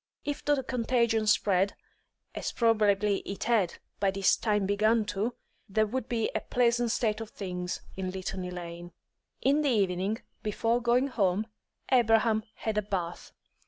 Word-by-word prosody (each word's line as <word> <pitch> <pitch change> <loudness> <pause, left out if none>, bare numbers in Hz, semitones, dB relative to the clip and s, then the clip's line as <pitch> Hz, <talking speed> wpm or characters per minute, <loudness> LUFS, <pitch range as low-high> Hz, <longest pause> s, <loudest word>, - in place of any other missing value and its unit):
If 290 -1 -3
the 290 -2 +2
contagion 235 -3 +1
spread, 195 -2 +3 0.6
as - - -3
probably 210 -3 +3
it 195 - -6
had 215 -7 +2 0.2
by 200 - +3
this 195 0 +3
time 210 -3 0
begun 215 +3 +2
to, 220 +5 -1 0.3
there 215 +2 +2
would 255 +3 -4
be 230 -3 0
a - - 0
pleasant 240 -1 +2
state 220 -1 0
of 225 - -6
things 180 -2 -4
in 190 -1 -3
Litany 185 0 -4
Lane. 175 0 -7 0.5
In 285 +3 +4
the 290 - +2
evening, 195 -1 +1 0.2
before 225 +3 0
going 245 +3 +2
home, 200 -3 +1 0.5
Abraham 225 -3 +4
had 215 -1 -1
a - - 0
bath. 185 -4 -4
215 Hz, 150 wpm, -29 LUFS, 195-235 Hz, 0.6 s, In